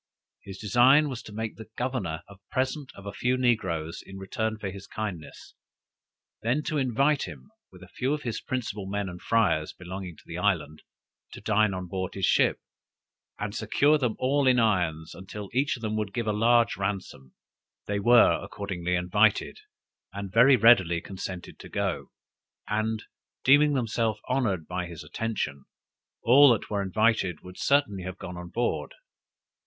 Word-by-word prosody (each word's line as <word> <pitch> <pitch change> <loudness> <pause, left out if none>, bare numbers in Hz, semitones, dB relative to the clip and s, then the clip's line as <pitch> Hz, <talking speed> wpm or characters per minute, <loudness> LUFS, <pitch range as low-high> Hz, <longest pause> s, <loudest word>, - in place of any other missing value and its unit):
He 100 - -11
design 120 +9 +4
was 125 -3 -5
to - - -12
make 110 +1 -5
the 110 -1 -11
governor 105 -11 -2
a 100 - -14
present 130 +2 -2
of 100 - -12
a 100 - -5
few 125 +1 0
negroes 95 -11 0
in 95 - -11
return 110 +3 -3
for 100 -3 -5
his 100 0 -10
kindness; 95 -9 -6 0.9
then 125 +7 0
to 150 - -1
invite 135 +3 +1
him, 210 - -11 0.2
with 90 0 -14
a - - -12
few 130 +7 -2
of 150 0 -2
the 120 -2 -2
principal 110 -6 -3
men 100 0 -2
and 90 -1 -8
friars 100 -9 +1
belonging 90 -2 -8
to - - -18
the 85 +1 -6
island, 80 -7 0 0.5
to - - -9
dine 110 -3 +2
on 90 0 -4
board 95 +1 -4
his 95 -2 0
ship, - - +3 0.8
and 105 -1 -4
secure 150 +6 +2
them 125 -5 0
all 135 +1 +1
in 125 -1 +5
irons, 90 -8 +1
until 95 +2 -8
each 135 +2 +1
of 120 - -12
them 110 0 -1
should 100 -2 -4
give 120 - -1
a 105 - 0
large 115 +2 +3
ransom. 95 -9 -4 0.5
They 100 0 -1
were 120 +3 +5
accordingly 90 -3 -3
invited, 100 +4 +2 0.5
and 100 -1 -6
very 125 +4 +7
readily 100 -8 +5
consented 95 0 -7
to - - -11
go: - - -2 0.6
and 110 0 -1 0.4
deeming 145 +2 +5
themselves 115 -4 0
honored 105 - 0
by 90 0 -3
his 85 -3 -9
attention, 75 -5 -3 0.6
all 135 +3 +7
that 110 - -4
were 100 -1 0
invited, 100 -3 +1
would 90 0 -11
certainly 140 -9 +2
have 95 +1 -6
gone 90 - -7
on 90 0 -8
board. 120 +6 -2
105 Hz, 170 wpm, -27 LUFS, 95-120 Hz, 0.9 s, very